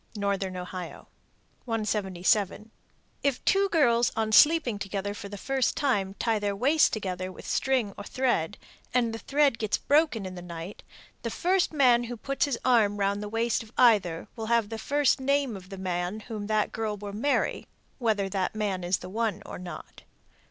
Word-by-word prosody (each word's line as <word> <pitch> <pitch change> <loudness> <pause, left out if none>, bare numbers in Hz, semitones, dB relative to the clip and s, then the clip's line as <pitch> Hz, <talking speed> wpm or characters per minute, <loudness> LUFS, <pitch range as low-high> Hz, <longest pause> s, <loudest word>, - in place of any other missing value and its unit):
Northern 200 -2 -1
Ohio. 180 -1 -7 0.6
177. 210 -2 0 0.5
If 280 -3 -1
two 395 0 +3
girls 240 -9 +3
on 220 -1 0
sleeping 295 -4 +5
together 200 0 -3
for 200 -1 -8
the 205 - -7
first 265 +4 0
time 200 -9 0
tie 225 0 0
their 205 -1 -1
waists 280 +9 +4
together 185 -3 -4
with - - -12
string 255 -7 0
or - - -6
thread, 210 -7 0 0.4
and 235 -2 +2
the 225 - -5
thread 280 +1 +2
gets 215 -2 0
broken 290 -8 +2
in 185 - -6
the 180 - -8
night, 170 +2 -8 0.4
the - - -3
first 365 +1 +1
man 250 -5 +4
who 240 0 -6
puts 275 +6 0
his 280 -4 -2
arm 220 -5 +4
round 200 0 0
the 210 - -5
waist 225 +1 0
of 220 -1 -12
either 200 -9 +4
will 225 -1 -5
have 230 -2 +2
the 225 -1 -5
first 285 +4 +2
name 275 -3 +1
of 185 -1 -11
the 195 - -8
man 185 +2 -3
whom 215 -2 -6
that 215 -1 +1
girl 220 -2 -3
will 205 0 -7
marry, 260 +8 0 0.3
whether 215 -5 +1
that 190 +1 -2
man 200 -4 -2
is 175 +1 +1
the 180 - -9
one 220 +1 -2
or - - -7
not. 180 -1 -9
215 Hz, 180 wpm, -27 LUFS, 195-245 Hz, 0.6 s, sleeping